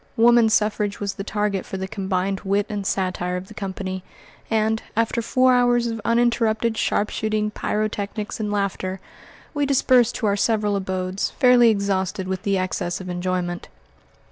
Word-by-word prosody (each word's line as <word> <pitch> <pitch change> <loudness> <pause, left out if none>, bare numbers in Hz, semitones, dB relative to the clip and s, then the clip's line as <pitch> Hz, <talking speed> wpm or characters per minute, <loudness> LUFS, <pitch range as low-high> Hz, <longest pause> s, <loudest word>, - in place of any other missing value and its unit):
Woman 235 0 +6
suffrage 210 -1 +1
was 200 -1 -2
the 195 - -6
target 205 -2 -1
for 190 - -6
the 190 0 -4
combined 195 -1 -2
wit 200 +1 0
and 200 -2 -3
satire 180 -1 -1
of 185 +1 -8
the - - -10
company, 190 -2 -5 0.5
and, 220 0 +1 0.2
after 230 +1 +1
four 255 +2 +3
hours 245 -1 +3
of 225 -1 -3
uninterrupted 230 -1 +1
sharpshooting, 215 0 0
pyrotechnics, 210 0 -3
and 210 -1 -2
laughter, 195 -2 -2 0.5
we 290 -2 0
dispersed 255 -3 +3
to 225 - -2
our 200 -1 +2
several 210 -1 +1
abodes, 190 0 -2
fairly 250 -2 +5
exhausted 195 -3 -1
with 185 -1 -3
the 195 -1 0
excess 180 -1 -2
of 185 -1 -7
enjoyment. 175 0 -2
205 Hz, 155 wpm, -23 LUFS, 190-225 Hz, 0.5 s, Woman